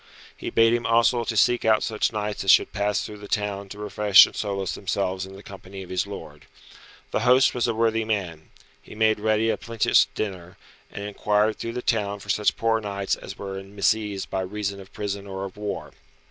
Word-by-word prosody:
He - - -5
bade 115 0 +4
him 120 0 0
also 115 +1 +3
to 110 -1 -3
seek 120 +4 +3
out 110 -1 +3
such 110 -2 0
knights 105 -2 -3
as 95 - -2
should - - +5
pass 105 -1 0
through 105 -1 -9
the 105 - -10
town 100 -1 -2
to 100 - -9
refresh 105 -1 +6
and - - -10
solace 100 -4 -2
themselves 95 0 -2
in 95 - -11
the 100 - -12
company 95 -1 -10
of 90 - -12
his 95 +2 -1
lord. 75 -7 -10 0.6
The - - 0
host 130 +2 +4
was 120 -1 0
a 115 - -1
worthy 115 0 +1
man. 95 -8 -3 0.3
He - - -13
made 110 0 +2
ready 110 +1 +2
a - - -2
plenteous 115 -1 +2
dinner, 95 -4 -5 0.3
and 100 - -6
inquired 105 +1 +1
through 115 - -5
the 125 0 -4
town 105 -3 0
for 100 - -13
such 105 +1 +1
poor 115 -1 +1
knights 100 -2 -2
as 95 - -10
were 95 -1 -5
in 95 +1 -13
misease 105 -1 0
by 95 - -2
reason 100 +1 -4
of 95 - -15
prison 100 -1 -4
or 95 0 -5
of 95 - -9
war. 105 0 -5
105 Hz, 215 wpm, -24 LUFS, 100-110 Hz, 0.6 s, refresh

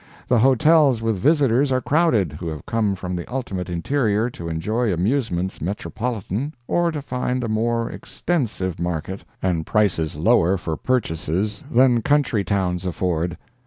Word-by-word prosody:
The 125 -3 +3
hotels 135 +1 +4
With 110 -4 0
visitors 140 - +3
are 130 - +3
crowded, 140 - +2
who 85 +3 -6
have 80 -3 -6
come 105 -3 0
From 90 -1 -4
the 85 +5 -6
ultimate 100 -9 -3
interior 110 +5 0
to 85 -5 -7
enjoy 105 +8 -1
Amusements 95 -1 -1
metropolitan, 110 - -3
or 175 -1 +1
to 150 -3 -5
find 125 -1 -2
A - - -1
more 115 +1 0
extensive 110 - -3
market, 85 +2 -3 0.2
and 90 -4 +1
prices 90 -7 +1
lower 95 +2 +3
For 80 -4 -3
purchases, 100 -2 -1
than 125 -1 +4
country 140 -6 +2
towns 90 -1 -1
afford. 90 -1 -1
105 Hz, 145 wpm, -22 LUFS, 90-125 Hz, 0.2 s, hotels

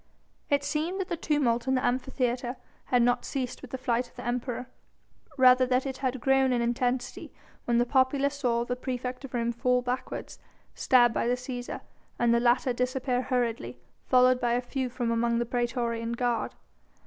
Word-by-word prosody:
It 285 -1 +2
seemed 315 +6 -2
that 380 0 -3
the 345 - -1
tumult 270 -7 0
in 265 - +2
the 255 - 0
Amphitheatre 250 0 -1 0.3
had 245 -1 +3
not 245 0 +2
ceased 255 -3 -4
with 270 - -10
the 260 - -4
flight 245 -1 -1
of - - -28
the 245 - -8
Emperor, 245 0 -2 0.7
rather 255 -1 +6
that 255 +1 +1
it 265 -1 -4
had 260 -1 -2
grown 270 +1 +3
in 245 - +2
intensity 245 +1 -1 0.3
when 240 -1 +2
the 240 - +3
populace 270 +2 +2
saw 235 -3 +1
the 245 - -2
praefect 250 0 -4
of 260 - -8
Rome 235 0 0
fall 250 +1 +1
backwards, 250 +1 -4 0.3
stabbed 240 -3 +4
by - - 0
the 245 - +2
Cæsar, 250 -1 -6 0.4
and 235 -1 +3
the 235 - +4
latter 245 +1 +2
disappear 250 0 -1
hurriedly, 245 -3 -2 0.3
followed 255 0 +5
by 240 -1 +1
a 245 - +2
few 255 +1 -3
from 240 -1 -2
among 235 0 +1
the 240 - 0
praetorian 235 -1 -1
guard. 240 -1 -1
250 Hz, 185 wpm, -28 LUFS, 240-260 Hz, 0.7 s, rather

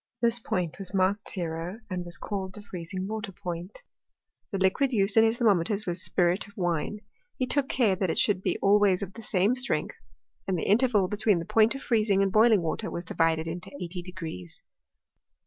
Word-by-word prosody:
This 235 +1 +3
point 180 -7 -3
was 195 0 -6
marked 195 +2 +1
ttro, 170 +2 -4
and 180 -3 -3
was 175 0 -8
called 190 -2 -5
the 210 - -10
freezing 185 0 -5
water 215 -2 -4
point. 175 +1 -7 0.7
The 195 - -1
liquid 190 +9 +2
used 200 -3 +1
in 225 - +7
his 225 +1 +2
thermometers 205 -2 +2
was 175 0 -2
spirit 180 +3 +1
of 200 - -19
wine: 175 +3 -1 0.4
h^ 255 - 0
took 280 +1 +1
care 225 -7 +2
that 185 -1 -1
it - - -1
should 200 -3 +2
be - - 0
always 200 -2 +4
of 195 -1 -7
the 230 - -10
same 200 -1 +2
^l - - -3
strength, 255 - -1 0.5
and 190 -2 0
the - - -3
interval 215 -3 +3
between 205 0 +2
the 170 - -4
point 225 +6 +3
of 270 - -7
freez 225 -3 +1
ff 200 - +3
ing 195 0 +3
and 195 - 0
boiling 215 -3 +5
water 210 +7 -2
was 170 - -5
divided 165 -2 +1
into 175 +2 -6
eighty 175 +1 -5
degrees. 165 - -8
195 Hz, 205 wpm, -27 LUFS, 175-215 Hz, 0.7 s, in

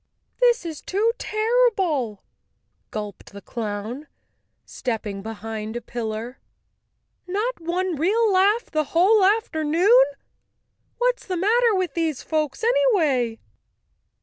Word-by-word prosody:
"This 485 -6 +3
is 320 -3 -6
too 425 +4 +1
terrible," 425 - +1 0.7
gulped 210 -1 -7
the 200 - -8
clown, 225 +5 -5 0.6
stepping 215 -5 -4
be¬ 220 +3 -6
hind 220 +1 -6
a 240 - -3
pillar. 230 +1 -5 0.9
"Not 425 +6 -2
one 350 +2 -1
real 415 +7 +2
laugh 405 +5 +3
the 310 -1 0
whole 405 +5 +5
after¬ 385 -5 +2
noon! 385 +12 +5 0.9
What's - - 0
the 365 -2 -2
matter 450 +4 +3
with 365 -6 -1
these 320 -5 -1
folks 305 - -2
anyway?" 345 - +2
340 Hz, 115 wpm, -23 LUFS, -, 0.9 s, whole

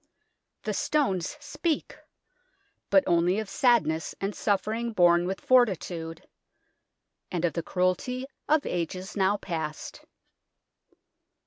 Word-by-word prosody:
The - - -2
stones 280 - 0
speak 300 +2 -2 0.9
but 290 - +5
only 175 +2 +2
of 220 -1 -2
sad 235 - +3
ness 160 +1 -3
and 195 +1 -2
suffering 220 +4 -1
borne 175 -2 +4
with 190 +1 -3
fortitude, 180 -9 +1 1.0
and 175 -1 0
of 170 - 0
the 170 - -2
cruelty 185 +10 -1 0.2
of 305 -1 +3
ages 185 +3 -3
now 200 0 +2
past. 160 -5 -5
190 Hz, 110 wpm, -27 LUFS, 175-235 Hz, 1.0 s, but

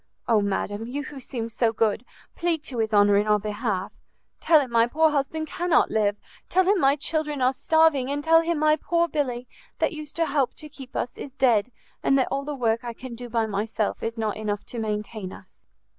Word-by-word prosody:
Oh, 220 -3 +4
madam! 205 +2 -2
you 285 +4 -4
who 290 -2 -8
seem 240 -3 -5
so 230 0 +1
good, 220 0 0 0.3
plead 335 -3 -1
to 250 -6 -5
his 220 0 0
honour 205 -1 +5
in 205 +1 +1
our 210 0 +4
behalf! 210 -2 -3 0.5
tell 320 -2 +5
him 265 -4 -3
my 230 0 +4
poor 315 +5 +3
husband 300 +2 -1
cannot 345 +2 +1
live! 205 -2 +2 0.3
tell 375 - +4
him 390 +1 +3
my 275 +1 +4
children 300 -1 -2
are 255 +1 +3
starving! 305 -2 +3
and 290 +1 -2
tell 325 +1 +6
him 335 0 -1
my 305 0 +3
poor 340 +2 +1
Billy, 255 -6 -2 0.3
that - - 0
used 305 -2 -8
to 335 - +1
help 280 -4 0
to 305 - -10
keep 270 -3 -12
us, 245 - -2
is - - -6
dead, 250 -4 +2 0.3
and 275 - +3
that 260 - +2
all 275 0 -2
the 295 0 -4
work 235 -2 0
I 240 -1 -5
can 250 +1 -9
do 245 +1 -8
by 230 -1 +1
myself 215 0 -2
is 230 +1 -3
not 220 -2 -2
enough 210 -1 -3
to 235 - -3
maintain 210 -2 -4
us!" 190 - -15
250 Hz, 220 wpm, -25 LUFS, 220-300 Hz, 0.5 s, tell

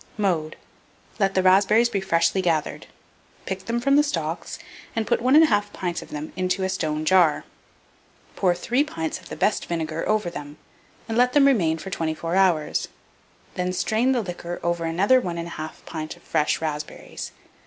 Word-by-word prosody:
Mode. 170 -7 0 0.6
Let 195 -1 +1
the 185 - +3
raspberries 205 +5 +5
be 200 -5 -2
freshly 170 0 +2
gathered; 165 -4 -1 0.6
pick 190 0 -5
them 235 +1 -1
from 275 +3 +3
the - - +7
stalks, 165 - -3 0.4
and 225 -1 0
put - - +1
1 255 +3 +4
1/2 205 -6 0
pint 175 -3 -3
of - - -12
them 150 +1 -6
into 185 +1 -1
a 190 - 0
stone 155 -3 -2
jar; 175 -3 +4 0.9
pour 180 -2 +2
3 245 +10 +1
pints 160 - -4
of - - -15
the - - -6
best 210 - 0
vinegar 165 -1 -3
over 215 -5 +1
them, 145 -2 -8 0.5
and 225 +1 0
let 250 0 +4
them 290 -1 +6
remain 180 -13 +3
for 190 +4 -8
24 165 +1 -2
hours; 180 -6 +2 0.7
then 180 0 -1
strain 220 +7 +1
the 245 -3 +1
liquor 175 -1 -6
over 170 -1 -1
another 200 +10 +3
1 175 -5 -4
1/2 170 -2 -7
pint 155 -1 -6
of - - -22
fresh 150 - +1
raspberries. 150 -2 -5
180 Hz, 175 wpm, -24 LUFS, 165-210 Hz, 0.9 s, the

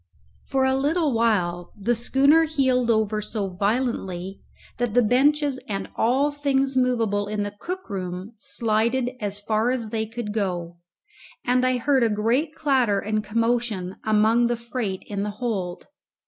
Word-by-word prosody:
For 270 -1 +1
a 265 - +2
little 290 +2 +1
while 180 -7 0
the 230 +5 +1
schooner 275 +7 +4
heeled 260 -6 +1
over 215 -1 +1
so 210 -2 -3
violently 195 -2 -2 0.4
that 240 -2 -1
the 245 - +5
benches 275 +4 +2
and 195 -1 -4
all 265 +6 +2
things 275 -2 0
movable 230 -5 +1
in 210 0 -2
the 205 - -4
cook 370 +2 -5
room 185 +1 -5
slided 235 +4 0
as 205 -1 -3
far 215 +3 0
as 235 -4 -2
they 220 -1 -1
could 225 -2 -5
go, 175 -5 -2 0.7
and 250 0 +2
I 255 0 +2
heard 270 +2 +2
a 230 - +3
great 235 +9 0
clatter 255 -10 +2
and 215 +1 -1
commotion 225 -3 -1
among 220 +2 +3
the 240 0 -1
freight 235 -5 -4
in 200 -1 -4
the 210 - -2
hold. 195 -8 -3
230 Hz, 155 wpm, -24 LUFS, 205-260 Hz, 0.7 s, the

